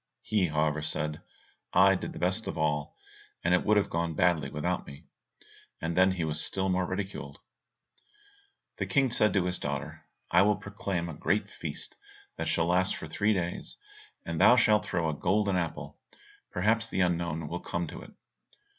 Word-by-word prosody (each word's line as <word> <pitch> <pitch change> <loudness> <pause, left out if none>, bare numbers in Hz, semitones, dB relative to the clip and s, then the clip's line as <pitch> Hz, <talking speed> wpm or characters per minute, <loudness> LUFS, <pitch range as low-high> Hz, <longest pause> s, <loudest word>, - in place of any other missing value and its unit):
He, 100 -4 +1
however, 75 0 0
said, 75 0 -3 0.5
"I - - +6
did - - -3
the - - -9
best 95 +5 0
of - - -4
all, 75 -2 -1 0.5
and 90 - +2
it 90 - +3
would 105 0 +3
have 100 - +1
gone 85 -1 -1
badly 85 -6 +2
without 85 +6 -2
me." 70 - -11 0.7
And 80 +1 -2
then 95 +1 +5
he 90 -3 -2
was 75 0 +1
still 95 0 +1
more 90 -1 +1
ridiculed." 95 +1 -5 1.4
The - - -2
King 135 -3 +2
said 110 -2 +3
to 95 -2 +2
his 90 0 -1
daughter, 70 -1 -5 0.2
"I - - +6
will 105 +1 +4
proclaim 100 -3 -4
a 80 - -6
great 85 +7 0
feast - - -6 0.4
that - - -3
shall 80 - +1
last 90 +2 +2
for - - -7
three 100 +7 +1
days, 90 -1 -4 0.5
and 85 -1 -2
thou 120 - +8
shalt 105 -3 +3
throw 85 -2 0
a 80 - 0
golden 100 +5 +1
apple. 85 -3 -3 0.5
Perhaps 115 +5 +1
the 95 - 0
unknown 85 -3 0
will 85 +3 -4
come 85 0 -3
to - - -8
it." - - -12
90 Hz, 180 wpm, -29 LUFS, 80-100 Hz, 1.4 s, thou